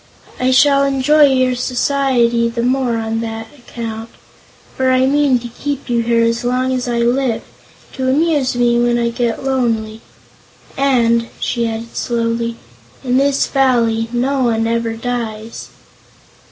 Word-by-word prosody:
"I 255 - +1
shall 275 +2 +4
enjoy 275 +2 +4
your 255 -1 +2
society 245 -2 +1
the 235 0 -3
more 250 -2 0
on 225 0 -2
that 225 0 -6
account. 230 -3 -7 0.7
For 260 0 +1
I 255 0 +3
mean 280 -1 +3
to 240 0 -7
keep 275 +2 -5
you 235 -1 +2
here 230 0 +2
as 230 +1 0
long 255 +1 0
as 255 -1 -2
I 240 -1 -1
live, 245 0 0 0.5
to 260 -1 -2
amuse 290 -2 +1
me 240 -1 +2
when 240 0 +2
I 235 0 0
get 235 0 -2
lonely. 230 -5 -1 0.7
And," 235 -4 +2
she 235 -1 -1
added 225 +1 -7
slowly, 230 0 -2 0.5
"in 250 -1 +1
this 275 0 +2
Valley 235 -4 +1
no 260 +3 0
one 225 -1 +1
ever 230 0 -1
dies." 225 -2 -5
240 Hz, 145 wpm, -17 LUFS, 230-260 Hz, 0.7 s, shall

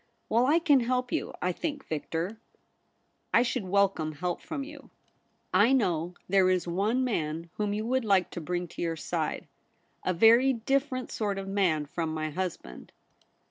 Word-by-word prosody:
Well, 235 +3 +3
I 305 +4 +5
can 300 -5 +4
help 250 +1 -1
you, - - -1
I 180 - +2
think, 290 - -4
Victor.' 165 +7 -3 0.5
' - - -45
I 235 - +6
should 250 -3 -2
welcome 185 -5 +1
help 175 +3 -3
from 290 -4 -4
you.' 290 0 -11 0.4
' - - -43 0.2
I - - +4
know 175 -8 +1
there 190 0 +4
is 180 -2 +1
one 205 +9 +1
man 165 -8 -2
whom 210 -1 0
you 210 +1 -2
would 260 +2 +1
like 195 -4 +2
to 175 - -5
bring 175 +2 -2
to - - -8
your 165 -1 -1
side; 155 - -3 0.6
a - - +1
very 230 +8 +6
different 255 +1 -1
sort 205 -3 -2
of 195 0 -5
man 185 -7 +1
from 160 +2 -3
my 155 0 -2
husband.' 160 - -5
195 Hz, 180 wpm, -28 LUFS, 170-250 Hz, 0.6 s, I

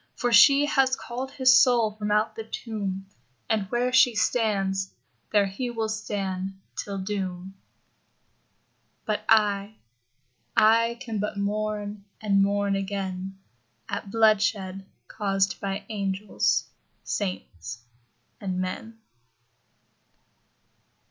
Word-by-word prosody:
For 245 -1 0
she 280 +6 +7
has 270 -3 +3
called 255 +2 -5
his 260 -2 +5
soul 235 -4 +4
from 210 0 -4
out 210 +2 +1
the 225 - -5
tomb. 205 -4 -4 0.4
And 210 -4 0
where 245 +1 0
she 250 -2 +5
stands, 195 -2 0 0.4
there 205 -2 +4
he 200 +6 -4
will 225 -2 -2
stand 195 -3 -3 0.2
till 200 -1 -4
doom...... 190 -1 -4 1.5
But 215 0 -1
I, 210 -1 +3 0.8
I 230 +2 +4
can 225 -5 -4
but 210 0 -3
mourn, 210 0 -2 0.2
and 200 -2 +2
mourn 200 0 +1
again 195 -1 -4 0.5
At 200 - -4
bloodshed 205 -3 +2 0.2
caused 195 -3 0
by 195 0 -4
angels, 200 -1 0 0.4
saints, 120 - -4 0.6
and 190 -2 -3
men. 185 +5 -4
205 Hz, 105 wpm, -26 LUFS, 195-225 Hz, 1.5 s, she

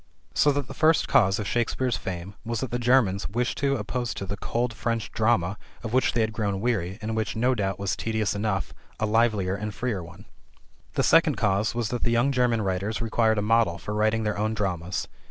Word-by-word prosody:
So 145 - +4
that 140 -2 -2
the - - -8
first 160 0 +3
cause 95 -3 +4
of 105 - -3
Shakespeare's 120 +1 0
fame 90 +1 -5
was 115 -1 -3
that 130 - -4
the 120 - -1
Germans 120 -6 +2
wished 120 +4 -1
to 140 0 +2
oppose 120 +2 -3
to 100 - -4
the 100 +2 -4
cold 120 +4 -2
French 115 0 -2
drama, 105 -4 +1 0.2
of 115 0 -5
which 130 0 +3
they 115 - +2
had 110 0 0
grown 100 -3 -1
weary, 100 -5 -1
and 110 +1 -2
which, 110 -2 -2
no 125 +3 +2
doubt, 95 -5 -1
was 100 -1 -1
tedious 110 -2 -1
enough, 100 -1 -2 0.3
a 110 - +1
livelier 105 -4 +2
and 105 +1 -4
freer 120 -7 -2
one. 85 +1 -13 0.7
The - - +2
second - - +5
cause 105 +4 +1
was 120 -3 -1
that 120 - -3
the - - +1
young 120 +4 +3
German 125 -4 +2
writers 95 +3 -1
required 110 -1 +2
a 105 - +1
model 110 -5 +3
for 105 - -6
writing 110 +1 +1
their 105 -1 -1
own 110 +1 0
dramas. 90 -4 -2
110 Hz, 215 wpm, -26 LUFS, 100-120 Hz, 0.7 s, second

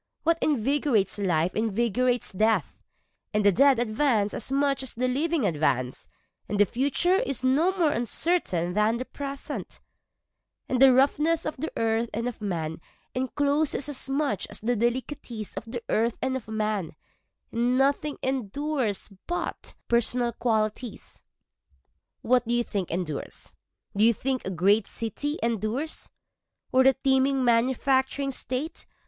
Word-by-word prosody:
What 330 0 +2
invigorates 265 -7 +1
life 175 -3 +1
invigorates 235 +3 +1
death, 220 +4 +1 0.6
And 210 -1 +2
the 200 - +7
dead 275 +5 +5
advance 225 -2 +1
as 240 - -5
much 275 0 +1
as 265 - -4
the 250 +2 0
living 295 +1 0
advance, 140 -7 0 0.4
And 205 - -1
the 205 - +7
future 285 - +1
is 270 -7 -2
no 315 +9 +2
more 325 -5 +3
uncertain 230 - 0
than 210 +3 +2
the 255 - -4
present, 280 0 -6 0.9
For 255 - 0
the 265 0 +8
roughness 300 +5 +2
of 305 - -2
the 315 +5 -4
earth 225 +1 +1
and 230 +2 -1
of 245 -3 -6
man 165 -5 -3 0.3
encloses 285 +2 0
as 270 -2 -4
much 275 -7 0
as - - -7
the 240 +3 0
delicatesse 235 -1 -3
of - - -5
the 235 +1 -6
earth 230 +1 +1
and 260 0 -1
of 255 -5 -5
man, 215 -7 -2 0.6
And 240 +2 +1
nothing 280 +2 +1
endures 260 -3 -1
but 350 - -4
personal 240 +1 +3
qualities. 220 0 -2 1.0
What 245 -1 +2
do 240 - +1
you 240 - +2
think 200 -6 -3
endures? 165 -4 -4 0.4
Do 205 - +3
you 230 0 +5
think 260 +2 -2
a - - -1
great 195 +4 +2
city 290 +7 -3
endures? 230 +7 -2 0.6
Or 260 - +5
a 265 - +6
teeming 265 0 +2
manufacturing 265 +3 +2
state? 265 +5 -4
245 Hz, 140 wpm, -26 LUFS, 215-275 Hz, 1.0 s, the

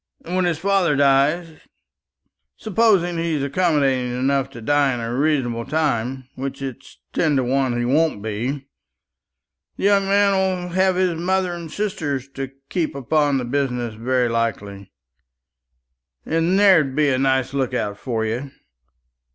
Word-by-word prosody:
And 175 - -4
when 185 -1 +2
his 170 -3 0
father 190 -3 +2
dies 145 +4 +2 1.0
supposing 195 -5 +2
he's 165 -4 -1
accommodating 140 -5 +1
enough 135 +1 0
to 135 - -11
die 140 +2 +2
in - - -5
a 115 0 -4
reasonable 130 -4 0
time, 130 -3 -1
which 135 +1 -5
it's 135 -1 -8 0.2
ten 155 -4 +1
to 130 - +2
one 130 -1 0
he 120 - -1
won't 150 -1 +2
be 120 +7 -4 1.1
the - - -6
young 200 0 +4
man 200 0 +3
will 185 -2 0
have 190 0 +2
his 185 -1 +1
mother 185 0 0
and 170 -2 -7
sisters 155 -11 -3
to 135 -1 -6 0.2
keep 170 -6 -2
upon 145 +1 +1
the 125 - -2
business 125 -3 -2
very 125 +3 0
likely, 100 -4 -3 1.3
and 165 +4 +1
there'd 175 -10 +4
be 150 -1 +3
a 130 -1 +1
nice 130 -1 +1
look 130 -2 -1
out 105 -4 -2
for 110 0 -3
you. 120 +6 -3
140 Hz, 150 wpm, -21 LUFS, 125-170 Hz, 1.3 s, young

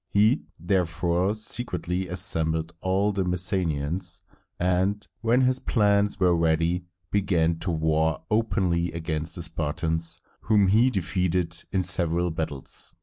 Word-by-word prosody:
He 110 +7 +2
therefore 90 +2 0
secretly 95 -5 -3
assembled 80 -3 +3
all 95 +3 +1
the 100 -1 -1
Messenians, 90 -2 -1 0.4
and, 95 +3 0
when 120 +3 +2
his 130 0 +2
plans 100 -4 +1
were 90 -2 +3
ready, 85 +2 0 0.3
began 85 -5 +1
to 90 - -4
war 80 -1 0
openly 95 -6 0
against 80 -1 -2
the 85 - -4
Spartans, 80 +1 -1 0.2
whom 105 -3 +2
he 115 +6 +4
defeated 90 -4 -1 0.2
in 95 -1 0
several 85 -1 +3
battles. 80 -4 +1
90 Hz, 120 wpm, -25 LUFS, 80-100 Hz, 0.4 s, he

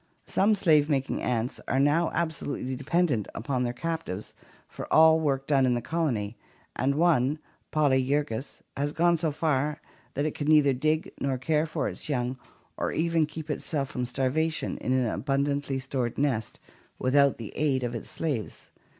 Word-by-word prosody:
Some 210 +2 +3
slave 155 -6 +4
making 135 -2 0
ants 120 0 -1
are 130 - +1
now 150 +4 +3
absolutely 150 -5 -2
dependent 140 - 0
upon 125 +3 -2
their 120 -1 0
captives 160 - -4 0.3
for - - -9
all 160 0 +7
work 135 -3 0
done 140 -2 +3
in 125 -1 +3
the - - 0
colony, 120 -7 -1 0.4
and 140 +2 +1
one, 150 -4 +3 0.3
Polyergus, 140 -3 0
has 145 +1 -1
gone 170 0 +3
so 160 0 0
far 150 -1 0 0.4
that 145 - 0
it 155 - -1
can 145 - -4
neither 150 -3 +5
dig 155 +5 0
nor 135 -1 0
care 150 +4 +1
for - - -2
its - - -6
young 125 -2 -1 0.4
or - - -1
even 165 -1 +1
keep 155 0 -6
itself 145 -2 -2
from 125 -3 -2
starvation 135 +6 -1
in - - -2
an 130 -1 +2
abundantly 140 +2 -1
stored 130 -3 -3
nest 130 -7 -1 0.4
without 140 +1 +3
the 115 -3 -8
aid 140 -4 +1
of 120 -1 -2
its 115 - -6
slaves. 135 -10 -4
140 Hz, 165 wpm, -27 LUFS, 130-155 Hz, 0.4 s, all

